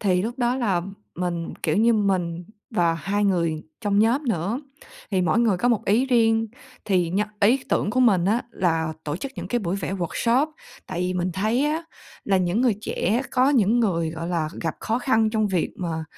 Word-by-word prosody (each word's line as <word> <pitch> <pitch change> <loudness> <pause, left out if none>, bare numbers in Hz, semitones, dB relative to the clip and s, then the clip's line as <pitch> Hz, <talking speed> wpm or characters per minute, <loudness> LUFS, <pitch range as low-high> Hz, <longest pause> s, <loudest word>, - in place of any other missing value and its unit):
Thì 185 -3 +2
lúc 240 +4 -4
đó 245 0 +1
là 195 -9 0 0.3
mình, 175 -2 -3
kiểu - - +1
như, 230 +2 +4
mình 180 -5 0 0.3
và 170 -7 +2
2 200 +4 -1
người 170 -5 +1 0.2
trong 205 -2 +1
nhóm 235 +7 +3
nữa, 200 - -1 0.5
thì 190 -3 +1
mỗi 170 +1 +2
người 225 -5 +3
có 240 +7 +1
một 230 -4 +1
ý 230 +6 +2
riêng. 225 -3 +3 0.4
Thì 180 -4 +1
nh 190 - 0 0.2
ý 245 +6 +3
tưởng 205 - +1
của 255 +4 +1
mình 195 -8 +4
á 225 +6 +2
là 160 -5 0
tổ 150 0 -2
chức 270 +9 -6
những - - -6
cái 240 - +1
buổi 190 -2 -2
vẽ 190 0 -4
workshop, 230 - +1 0.4
tại - - -4
vì 180 0 -1
mình 180 0 -1
thấy 220 - +1
á 315 +2 -1 0.4
là 195 - +2
những 185 +4 +1
người 245 -5 +3
trẻ 220 +3 0
có 255 +1 +3
những 240 -3 +3
người, 170 -7 0
gọi 165 +1 -5
là, 165 -3 -1
gặp 165 -2 -2
khó 225 +2 -1
khăn 225 -4 +2
trong 215 -1 +1
việc 180 -4 0
mà, 165 -3 -3
200 Hz, 210 wpm, -24 LUFS, 175-235 Hz, 0.5 s, như